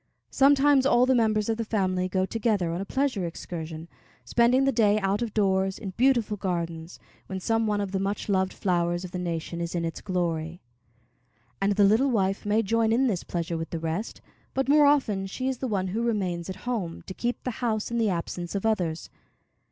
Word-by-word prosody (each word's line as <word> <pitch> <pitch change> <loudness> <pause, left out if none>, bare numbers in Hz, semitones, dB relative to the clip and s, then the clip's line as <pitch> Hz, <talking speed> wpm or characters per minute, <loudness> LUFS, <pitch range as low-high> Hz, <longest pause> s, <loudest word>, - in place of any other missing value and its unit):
Sometimes 275 0 +5
all 250 -2 +5
the 260 - +3
members 215 -3 +2
of 225 -1 0
the 230 - -1
family 185 -4 0
go 185 0 +1
together 205 -5 0
on 170 +3 -3
a - - -4
pleasure 265 -5 -1
excursion, 165 -1 -7 0.4
spending 245 +3 +3
the 275 - +3
day 215 -4 +3
out 200 +2 0
of 235 -2 -2
doors, 190 -2 +1
in 195 -4 -6
beautiful 235 -1 +2
gardens, 170 -3 -4 0.3
when 190 - -4
some 225 +3 0
one 210 -1 0
of 200 -2 -3
the 195 - -1
much 195 +2 -2
loved 190 -2 +1
flowers 175 -1 0
of 180 - -9
the 180 - -4
nation 170 -1 -3
is 170 +1 -3
in 170 -1 -1
its 165 - -5
glory; 170 -3 -2 1.0
and 200 +1 +2
the 205 +1 +3
little 220 +8 +4
wife 195 -4 0
may 215 +2 +2
join 225 +2 +1
in 250 +4 +3
this 200 -9 0
pleasure 170 -1 -3
with 165 - -5
the 165 - -3
rest, 165 +7 -4 0.3
but 270 0 0
more 295 +1 +6
often 215 -10 +2
she 255 +7 -4
is 260 -2 -2
the 260 - -2
one 190 -4 -1
who 220 +5 -2
remains 190 -7 -1
at 190 - -4
home 210 -9 -3
to 190 - -8
keep 240 +5 -3
the 250 - -2
house 220 -2 -1
in 235 - 0
the 220 -2 +2
absence 175 0 -4
of 200 - -2
others. 175 -7 -1
200 Hz, 210 wpm, -26 LUFS, 180-230 Hz, 1.0 s, more